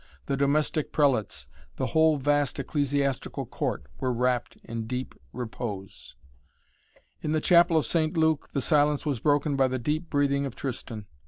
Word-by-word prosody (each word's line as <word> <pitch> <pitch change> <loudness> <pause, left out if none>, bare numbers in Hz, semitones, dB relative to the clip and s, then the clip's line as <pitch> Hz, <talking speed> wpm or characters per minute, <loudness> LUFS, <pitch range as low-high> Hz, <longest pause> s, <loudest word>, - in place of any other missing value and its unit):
The 140 - -1
domestic 145 +2 +1
prelates, 135 -9 +1 0.3
the - - -2
whole 160 -1 +4
vast 145 0 +1
ecclesiastical 140 -1 -1
court - - -3
were 130 - 0
wrapt 125 0 0
in 115 -1 -5
deep 125 +2 -4 0.2
repose. 110 -5 -6 1.1
In 155 - -1
the 155 - +2
chapel 170 0 +5
of 155 - +2
St. 160 0 0
Luke 160 -2 +2
the 140 - -1
silence 150 0 +2
was 140 -6 -1
broken 145 +2 +2
by 135 -1 +3
the 130 0 -2
deep 155 +7 -2
breathing 140 -1 +1
of 125 - -8
Tristan. 115 -5 -5
140 Hz, 155 wpm, -27 LUFS, 125-150 Hz, 1.1 s, chapel